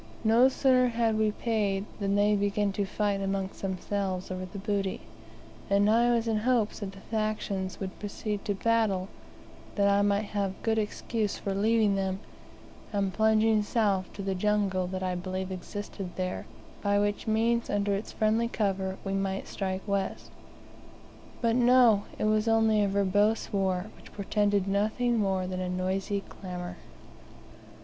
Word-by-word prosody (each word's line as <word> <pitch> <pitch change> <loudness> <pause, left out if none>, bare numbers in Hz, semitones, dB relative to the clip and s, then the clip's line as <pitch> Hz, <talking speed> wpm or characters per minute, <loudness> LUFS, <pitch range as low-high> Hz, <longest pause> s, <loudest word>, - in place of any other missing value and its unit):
No 230 +4 +5
sooner 255 -1 +3
had 230 -2 +1
we 215 0 +2
paid 210 -3 -1
than 200 -1 0
they 205 +1 +4
began 205 0 +1
to 200 +1 -1
fight 205 -1 -1
amongst 195 0 -3
themselves 190 -1 -2
over 185 0 -4
the 190 - -9
booty, 200 -1 -2 0.7
and 200 +1 +4
I 235 +3 +4
was 230 -1 +1
in 220 -1 +1
hopes 225 -1 +1
that 200 -2 -5
the 195 - -13
factions 215 -4 -2
would 190 -1 -6
proceed 205 0 -4
to 205 - 0
battle, 205 -3 +1 0.7
that 200 -1 +3
I 200 0 +4
might 205 +1 +2
have 200 -2 -2
good 220 -1 +2
excuse 215 0 -2
for 195 - -3
leaving 215 +1 +3
them, 190 -1 -1 0.7
and 195 -2 0
plunging 220 0 +3
south 205 -4 0
to 200 - -6
the 195 0 -1
jungle 195 -1 +1
that 185 +1 -4
I 185 -1 0
believed 185 +1 -4
existed 195 +1 -6
there, 185 -1 -3 0.3
by 200 0 +2
which 205 +1 0
means, 230 +2 +1
under 205 0 +1
its 200 +2 -3
friendly 220 +2 +1
cover, 195 -4 -1
we 195 - -3
might 195 0 -2
strike 190 0 -4
west. 200 -1 -2 1.1
But 230 -1 +2
no, 245 -4 +5
it - - -1
was 215 +1 +2
only 220 -2 +4
a - - +2
verbose 200 +3 +1
war, 190 +1 0
which - - -16
portended 205 -1 0
nothing 220 +4 +1
more 190 -2 0
than 185 0 -4
a 180 - -2
noisy 190 +2 -1
clamor. 180 -2 -7
205 Hz, 160 wpm, -29 LUFS, 195-220 Hz, 1.1 s, No